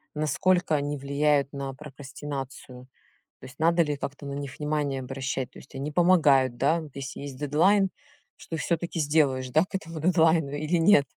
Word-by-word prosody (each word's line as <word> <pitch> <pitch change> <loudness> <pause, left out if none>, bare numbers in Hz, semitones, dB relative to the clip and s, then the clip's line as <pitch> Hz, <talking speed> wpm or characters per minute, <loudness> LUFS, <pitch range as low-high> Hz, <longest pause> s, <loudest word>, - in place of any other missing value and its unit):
Насколько 160 +3 +1
они 145 0 -1
влияют 140 0 +1
на 135 -1 -4
прокрастинацию? 135 -2 -8 0.5
То - - -24
есть 130 +4 -13
надо 170 +1 +4
ли 150 -1 -2
как-то 140 +1 -6
на 140 - -5
них 140 -2 -6
внимание 150 -3 -1
обращать? 130 -1 -4
То - - -13
есть - - -16
они 140 +3 -4
помогают, 145 -7 +4
да? 155 +6 +2
Вот 155 - -10
если 140 0 -6
есть 140 -2 -7
дедлайн, 185 +8 +3 0.5
что 165 - -7
всё-таки 170 +2 -2
сделаешь, 145 -4 +2
да, 155 +6 +3
к - - -8
этому 165 -3 -5
дедлайну 160 -3 +3
или 155 +4 -1
нет? 165 -4 +5
145 Hz, 170 wpm, -26 LUFS, 135-160 Hz, 0.5 s, нет